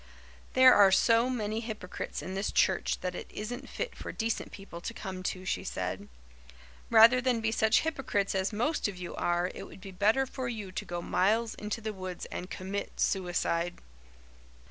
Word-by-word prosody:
"There 255 0 +8
are 200 -2 +7
so 230 +5 +4
many 220 -3 -1
hypocrites 220 -5 -5
in 185 - -5
this 195 +2 -1
church 190 - +2
that 180 -1 -2
it - - -7
isn't 240 +4 -6
fit - - -4
for - - -6
decent 225 0 -2
people 195 -4 -9
to 230 - -5
come 190 -4 -6
to," 185 0 -3
she - - -1
said. - - -4 0.8
"Rather 230 +2 +7
than 250 -2 +1
be 225 0 0
such 220 0 +3
hypocrites 265 -10 -1
as 190 +2 0
most 245 +9 0
of 200 -3 -6
you 180 -1 -6
are 175 +1 0
it - - -8
would - - -13
be 195 0 -9
better 215 +8 +3
for 260 -1 -5
you 210 -5 -5
to 205 - -4
go 175 -2 -4
miles 220 +5 +2
into 210 +2 -4
the 215 -1 -3
woods 185 -2 -6
and 180 - -5
commit 195 +2 -5
suicide." 175 -2 0
210 Hz, 185 wpm, -30 LUFS, 185-230 Hz, 0.8 s, There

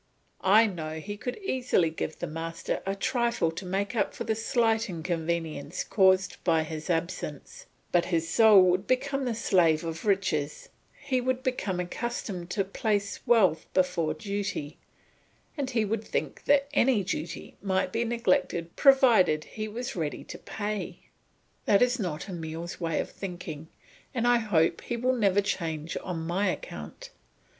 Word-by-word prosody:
I 210 +4 +6
know 160 -6 -4
he 205 +6 -6
could 245 +4 -5
easily 245 - +1
give 160 0 -4
the - - -3
master 165 +1 -4
a 195 - 0
trifle 235 -5 0
to 170 +4 -7
make 200 +5 -1
up 205 - 0
for - - -4
the 220 - 0
slight 225 0 +1
inconvenience 165 -2 -3
caused 190 -2 +3
by 165 -3 +3
his 155 0 -6
absence; 165 -4 -3 0.2
but 175 -1 +3
his 165 -2 0
soul 210 +2 +7
would 185 +2 +2
become 275 +1 0
the 240 -2 -1
slave 170 -8 +3
of 165 -1 -5
riches, 180 -8 0 0.3
he 265 -3 0
would 255 +1 -1
become 210 -8 -1
accustomed 180 -2 -4
to 195 +2 0
place 205 0 -1
wealth 190 -10 +4
before 170 -4 +1
duty, 200 -5 -4 0.8
and 280 -4 -2
he 230 -4 +1
would 220 +1 -2
think - - -3
that 280 -1 +4
any 250 -7 +3
duty 170 -2 -5
might 190 -1 0
be 230 - +1
neglected 185 -7 0
provided 235 - +5
he 215 0 -6
was 245 +5 -5
ready 155 -4 -3
to - - -9
pay. 210 0 -4 0.6
That 200 +3 +5
is 250 +1 +1
not 175 -5 -3
Emile's 170 -1 -6
way 165 -2 0
of - - -3
thinking, 175 -5 -7 0.5
and 240 0 +1
I 245 0 +5
hope 175 -8 +2
he 240 - -3
will 255 +2 +1
never 205 -4 +3
change 165 -5 -3
on 165 -3 -4
my 185 +5 +1
account. - - -7
195 Hz, 155 wpm, -28 LUFS, 165-230 Hz, 0.8 s, soul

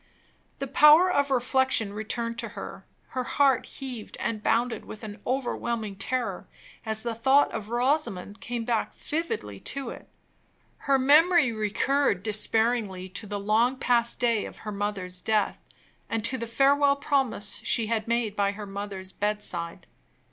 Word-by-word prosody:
The 275 - -3
power 300 +6 +6
of 285 -4 +2
reflection 260 -4 +1
returned 230 +2 -3
to 230 -1 -4
her; 195 0 -8 0.2
her 255 - -2
heart 270 0 +2
heaved 255 -5 -7
and 220 -2 -2
bounded 230 0 +1
with 215 - -10
an 210 0 -8
overwhelming 235 -5 -2
terror, 230 -2 -3 0.4
as 220 0 -2
the 235 -1 -2
thought 265 +5 +3
of 215 -2 -5
Rosamond 240 -6 0
came 240 -2 -4
back 230 -2 -1
vividly 105 - -3
to 275 - -3
it; - - -11 0.8
her 275 - +6
memory 295 +1 +5
recurred 215 0 +1
despairingly 215 -3 0
to 210 +3 -6
the 205 0 -3
long 225 +6 +2
past 240 -2 +1
day 230 -3 +2
of - - -10
her 210 - -3
mother's 195 -3 -3
death, 215 -1 0 0.5
and 225 -1 -1
to 260 - +2
the 235 -1 -4
farewell 280 +4 +4
promise 270 -7 -1
she 230 - +2
had 220 0 -1
made 230 -3 0
by 200 -1 +1
her 210 0 -7
mother's 195 -1 -6
bedside. 205 -5 -3
230 Hz, 150 wpm, -27 LUFS, 205-260 Hz, 0.8 s, power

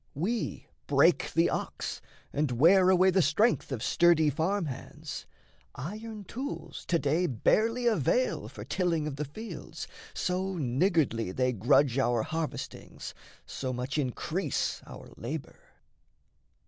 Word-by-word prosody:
We 205 - -2 0.2
break - - +4
the - - +3
ox, - - -3 0.3
and 150 0 +1
wear 180 +9 +6
away 185 0 +5
the 190 +1 +4
strength 220 -1 +2
Of 120 -4 -3
sturdy 165 -2 +4
farm 175 +6 0
hands; 135 -5 -7 0.5
iron 215 - -6
tools 260 - -6
to 170 - +3
day 160 +4 +1
Barely 225 - +2
avail - - +2
for - - -9
tilling 170 -5 0
of 145 -2 -4
the 150 - -2
fields, 215 +11 -8 0.3
So 185 +1 -1
niggardly 135 - +1
they 125 +5 +1
grudge 125 +5 +3
our 120 -4 +2
harvestings, 160 -1 -5 0.3
So 130 -1 -4
much 125 +4 -2
increase 155 +7 -1
our - - -11
labour. - - -6
165 Hz, 125 wpm, -29 LUFS, 135-195 Hz, 0.5 s, wear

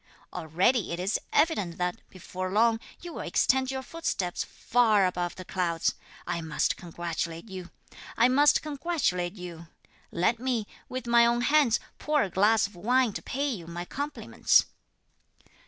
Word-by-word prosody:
Already 180 - +1
it 170 - -3
is 190 +4 0
evident 290 - +1
that, 180 0 -1
before 185 0 -6
long, 225 +2 +3 0.2
you 345 -1 -8
will - - -5
extend 260 0 +2
your 265 0 -3
footsteps 245 - -2
far 220 -5 +2
above 175 -1 -2
the 185 - -9
clouds! 170 -3 0 0.3
I 170 - -2
must 160 -2 0
congratulate 170 +1 -5
you! 185 -1 -7 0.5
I 235 - +6
must 285 +3 +4
congratulate 280 - -1
you! 170 -3 -9 0.4
Let 205 +7 +1
me, 245 -4 -1 0.2
with 255 0 -5
my 235 0 +5
own 235 0 +1
hands, 285 -3 +4 0.2
pour 300 -1 +2
a 190 - -4
glass 220 +4 +4
of 200 - -9
wine 240 +4 +2
to - - -5
pay 280 +3 -2
you 185 -10 -5
my 175 +1 -5
compliments." 285 +8 +1
210 Hz, 155 wpm, -28 LUFS, 175-255 Hz, 0.5 s, I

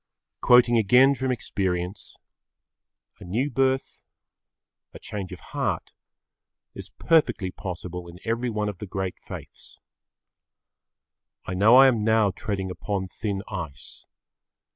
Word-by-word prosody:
Quoting 125 -1 +5
again 125 +6 +5
from 130 -1 -2
experience, 95 -4 -3 1.0
a - - -11
new 120 +11 -1
birth, 130 +1 0 0.9
a - - -9
change 100 -3 -6
of - - -8
heart, - - -2 0.8
is - - -9
perfectly 150 - +2
possible 90 -1 -7
in 85 0 -11
every 115 +2 -1
one 105 -2 -2
of 105 -3 -5
the 105 - -7
great 95 -1 -4
faiths. - - -11 1.7
I 95 - -4
know 105 +6 +5
I 135 +1 +9
am 120 -5 +3
now 110 -2 +3
treading 95 -1 -4
upon 95 0 -3
thin 100 0 -4
ice. 80 - -7
105 Hz, 120 wpm, -25 LUFS, 95-125 Hz, 1.7 s, I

